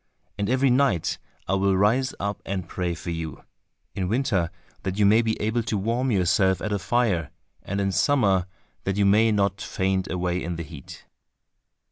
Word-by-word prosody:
And 100 0 -2
every 130 +1 +3
night 125 - +2 0.3
I 95 - 0
will 95 0 +2
rise 120 +7 +2
up 100 0 -3
and 95 -3 -4
pray 90 0 -2
for 85 - -5
you—in 80 +3 -7
winter 105 -8 +1 0.3
that 95 0 -3
you 105 - +4
may 110 +3 +6
be 110 -1 -1
able 110 +3 0
to 110 -1 -2
warm 115 +6 0
yourself 95 -2 +2
at 105 - -2
a 100 - 0
fire, 100 -8 +1 0.3
and 100 +1 -3
in 100 -1 +1
summer 95 - +2 0.4
that 95 0 -1
you 100 - +3
may 110 +3 +5
not 100 -2 +1
faint 95 0 -1
away 90 0 -1
in 85 0 -3
the 85 - -4
heat." 70 -3 -11
100 Hz, 175 wpm, -25 LUFS, 90-110 Hz, 0.4 s, may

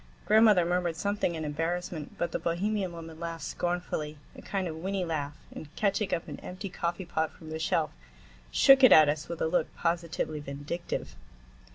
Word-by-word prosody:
Grandmother 215 -4 +6
murmured 175 -1 0
something 200 -1 -1
in 160 -1 -4
embarrassment, 165 +1 -3
but 170 - -1
the - - -2
Bohemian 190 +3 -1
woman 165 -1 -9
laughed 165 -1 -5
scornfully, 175 -4 -2 0.2
a - - -10
kind 195 -2 -2
of 160 -1 -5
whinny 190 +2 -2
laugh, 150 -3 -3 0.2
and 155 - -8
catching 205 0 0
up 165 - -1
an - - -7
empty 185 +2 -6
coffee 175 +2 -3
pot 160 -2 -1
from 155 -1 -12
the 160 - -4
shelf, 160 - +1 0.6
shook 270 - +6
it 255 - +9
at 155 -2 +8
us 150 +1 -2
with 170 - -3
a - - +2
look 165 -1 0
positively 165 -2 -1
vindictive. 145 +4 -5
170 Hz, 180 wpm, -29 LUFS, 160-180 Hz, 0.6 s, it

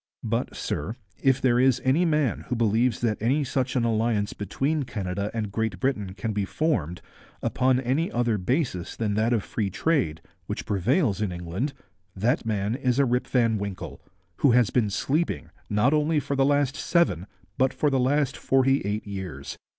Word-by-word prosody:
But, 115 +2 -2
sir, 95 +10 -3 0.3
if 135 -1 +3
there 125 -2 +3
is 130 -1 +4
any 145 +7 +3
man 150 -7 +1
who 125 - -1
believes 115 +1 +2
that 110 -4 0
any 135 +7 +2
such 130 0 -1
an 125 - +2
alliance 110 -2 +1
between 135 - -1
Canada 100 -5 -3
and 110 -3 -3
Great 110 -3 -2
Britain 105 -8 -1
can 110 0 -3
be 105 -1 0
formed 95 - -1 0.4
upon 130 0 +2
any 135 +7 0
other 120 -3 +1
basis 115 - -1
than 105 -3 -1
that 110 +3 +1
of 115 -5 +1
free 105 -4 -2
trade, 120 - 0 0.3
which - - -4
prevails 105 - +1
in 105 -3 0
England, 90 - -3 0.4
that 115 - 0
man 105 -1 0
is 125 -1 0
a 140 - +4
Rip 125 0 0
Van 115 -4 +2
Winkle, 100 -2 -6 0.4
who 135 -5 +4
has 120 -3 +4
been 115 -5 +2
sleeping 150 - -1 0.2
not 105 +7 +3
only 150 +1 +2
for 140 - -3
the 135 0 +3
last 145 -1 +2
seven 105 - +1 0.3
but 130 0 +4
for 150 - 0
the 135 - +2
last 135 +1 +1
forty 135 +1 +2
four 105 +2 -2
years. 95 -9 -6
120 Hz, 180 wpm, -26 LUFS, 105-135 Hz, 0.4 s, is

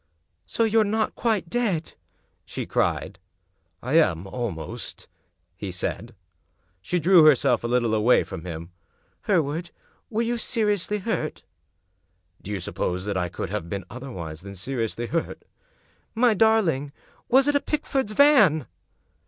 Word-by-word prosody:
"So 230 - 0
you're 225 0 +4
not 215 +1 0
quite 220 -7 0
dead?" 195 -7 -1 0.5
she - - -5
cried. - - -1 0.3
" 80 -2 -40
I 140 +7 +4
am 90 - +1
almost," 95 -6 -5 0.5
he 100 +1 -6
said. 105 +6 -4 0.7
She 135 - -1
drew 175 0 +6
herself 135 -5 +4
a - - -1
little 120 -2 +1
away 110 +3 +4
from 80 - -8
him. 85 0 -7 0.3
" - - -41
Hereward, 165 -2 +1 0.4
were 225 +1 0
you 235 0 -1
seriously 210 -3 0
hurt? 215 +3 -3 0.4
" 90 -1 -47
" 90 0 -39
Do - - -10
you 100 -2 -2
suppose 90 +1 -3
that 105 -1 -2
I 90 -1 -1
could - - -5
have 85 - -4
been 100 0 -4
otherwise 90 - -7
than 100 +1 -9
seriously 115 +3 -3
hurt?" 165 +7 -3 0.4
" - - -37 0.3
My 235 0 +4
darling 190 -11 +2
I - - -30 0.2
Was 265 +2 +5
it 290 - +3
a 285 - +3
Pickford's 270 -7 -2
van? 215 - +5
135 Hz, 155 wpm, -25 LUFS, -, 0.7 s, drew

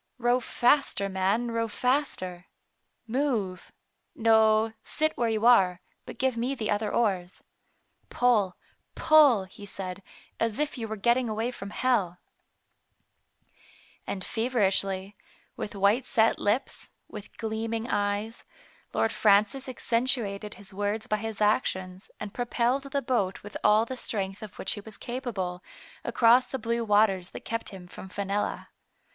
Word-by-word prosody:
" - - -48
Row 245 +1 +4
faster, 245 -4 +2
man, 195 +5 0
row 230 0 0
faster. 210 -8 -1 0.6
Move 225 -7 -2 0.2
— - - -48
no, 220 -1 +4
sit 310 0 -1
where 235 -1 +1
you 220 0 0
are, 190 -7 +5 0.3
but - - -8
give 265 -2 +1
me 245 +4 -1
the 220 -4 -2
other 210 0 0
oars. 190 -6 -1 0.7
Pull, 220 -7 +2 0.4
pull,*' 290 -10 +6
he 190 +2 -13
said, 195 -1 -6 0.2
" - - -24
as 225 -2 0
if 300 0 -1
you 230 -4 -4
were 220 - -4
getting 235 +3 +2
away 220 +3 -1
from 200 -5 -8
hell." 205 -7 0 1.9
And 190 -2 -4
feverishly, 195 -4 0 0.4
with 205 - -6
white 200 +6 +3
set 225 -2 +2
lips, 210 +6 -1 0.2
with 210 -1 -10
gleaming 225 +1 -3
eyes. 205 +1 -1 0.5
Lord 225 - +2
Francis 215 +6 +3
accentuated 230 -4 -1
his 200 0 -11
words 205 +2 -2
by 215 - 0
his 220 -1 -5
actions, 185 -3 0
and 210 -1 -6
propelled 245 +2 0
the 275 0 -2
boat 205 -7 -1
with 205 - -10
all 215 +2 +5
the 260 - -5
strength 195 -5 -4
of 215 -3 -9
which 190 - -3
he 205 - -4
was 215 0 -11
capable, 210 -8 -4 0.4
across 240 +2 +4
the 265 - -4
blue 235 0 -1
waters 205 -4 +3
that - - -10
kept 230 0 -3
him 190 -3 -10
from 190 +2 -10
Fenella. 200 +2 -2
220 Hz, 145 wpm, -28 LUFS, 200-240 Hz, 1.9 s, pull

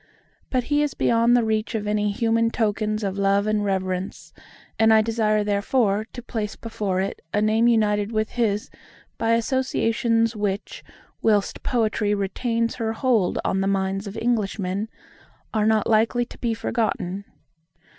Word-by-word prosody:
But 255 -2 0
he 290 +3 +1
is 295 -2 -1
beyond 235 +1 +3
the 240 - +2
reach 220 +1 -1
of 210 -1 -2
any 210 0 0
human 230 +2 +1
tokens 215 -1 -1
of 195 0 -2
love 200 +1 +2
and 215 -1 +1
reverence; 190 -1 -3 0.5
and 220 0 +5
I 220 0 +6
desire 215 -1 +1
therefore 205 +1 +1
to 245 - -8
place 220 -4 -4
before 205 -5 -3
it 195 - -4
a - - +3
name 220 +2 +3
united 210 -2 +2
with 215 -1 -1
his 215 -4 -1 0.5
by 225 0 +2
associations 230 -2 +1
which, 205 -1 -3 0.4
whilst 210 -3 +1
Poetry 215 -3 0
retains 230 +4 -1
her 225 -2 -1
hold 225 -6 +1
on 190 - +1
the 195 - 0
minds 195 +1 -1
of 200 - -7
Englishmen, 210 -3 -1 0.6
are 215 -1 +2
not 220 -1 +3
likely 230 +2 +2
to - - -13
be 230 -2 -1
forgotten. 200 -4 -2
215 Hz, 155 wpm, -23 LUFS, 205-230 Hz, 0.6 s, I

